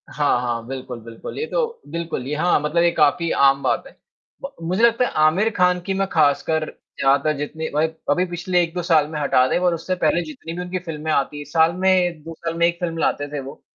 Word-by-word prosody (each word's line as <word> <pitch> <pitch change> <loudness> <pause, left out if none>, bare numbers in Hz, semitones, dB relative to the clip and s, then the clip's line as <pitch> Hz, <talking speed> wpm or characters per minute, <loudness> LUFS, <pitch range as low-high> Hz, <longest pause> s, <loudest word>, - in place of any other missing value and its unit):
हाँ, 145 -4 +1
हाँ, 120 -2 -3
बिल्कुल, 130 -2 -6
बिल्कुल। 115 0 -9
ये 455 - -1
तो 470 -1 -2
बिल्कुल 170 -6 -4
ये 150 - -2
हाँ, 170 +2 +2
मतलब 155 +3 +1
ये 170 - +4
काफ़ी 165 +2 +2
आम 140 0 +4
बात - - +1
है, - - -17 0.5
ब 275 - -6 0.2
मुझे 185 +6 0
लगता 235 +1 +4
है - - -2 0.2
आमिर 190 +8 +3
खान 180 0 +3
की 195 - -1
मैं 195 0 0
ख़ासकर 155 +1 +2 0.4
यहाँ 135 +1 +5
तक 155 - +2
जितनी 160 +2 -4
भाई 155 +2 +2 0.2
अभी 180 +5 +2
पिछले 180 +1 0
1-2 175 +1 -2
साल 160 -3 +3
में 155 -1 -5
हटा 135 -3 +3
दें - - +1
और 180 -1 +2
उससे 175 +3 -3
पहले 175 -1 +1
जितनी 155 +2 -8
भी 175 - -5
उनकी 180 +1 -4
फ़िल्में 155 -1 -4
आती 145 0 0
हैं, 145 - -7
साल 160 +1 +3
में 180 -3 +1
2 165 +1 -8
साल 165 +1 -5
में 170 - +4
1 170 0 -3
फ़िल्म 165 -2 -3
लाते 145 -2 0
थे 145 - -3
वो। 135 0 -9
165 Hz, 235 wpm, -21 LUFS, 145-180 Hz, 0.5 s, यहाँ